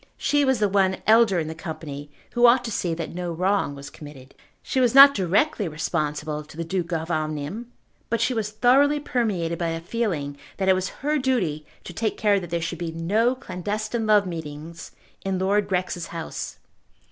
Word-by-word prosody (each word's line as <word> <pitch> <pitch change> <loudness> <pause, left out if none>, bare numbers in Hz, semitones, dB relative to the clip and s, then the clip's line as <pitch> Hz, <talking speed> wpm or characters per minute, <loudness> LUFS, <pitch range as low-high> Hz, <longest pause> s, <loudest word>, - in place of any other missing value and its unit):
She 290 0 +2
was 265 -2 +2
the 210 -1 +2
one 190 -1 +2
elder 220 -3 +5
in 160 -2 -1
the 160 - -4
company 155 -3 -7 0.2
who 240 0 +5
ought 245 +1 +5
to 230 - -4
see 175 -5 -1
that 165 -1 -5
no 175 0 -4
wrong 185 -3 0
was 140 0 -9
committed. 140 -3 -12 0.3
She 265 - -1
was 250 -1 +2
not 275 +1 +10
directly 200 - +1
responsible 150 -1 -2
to 150 +1 -15
the 165 - -2
Duke 175 +1 -3
of 165 0 -2
Omnium, 155 +9 -3 0.4
but 230 - 0
she 255 - +1
was 220 -3 -2
thoroughly 260 +7 +3
permeated 205 - -1
by 170 - 0
a 165 0 -3
feeling 165 -7 -3 0.2
that 190 - -1
it 190 - +6
was 185 0 -1 0.2
her 300 0 +2
duty 180 - -1 0.2
to 175 - -9
take 220 +3 -2
care 205 -2 +3
that 175 -3 -8
there 170 0 -2
should 170 - -4
be 170 -2 -3
no 210 +10 +1
clandestine 215 +1 -3
love 210 -2 +5
meetings 165 -1 -7 0.3
in 195 -1 -1
Lord 195 +2 +1
Grex's 180 -2 -2
house. 165 -1 -6
185 Hz, 195 wpm, -24 LUFS, 160-225 Hz, 0.4 s, not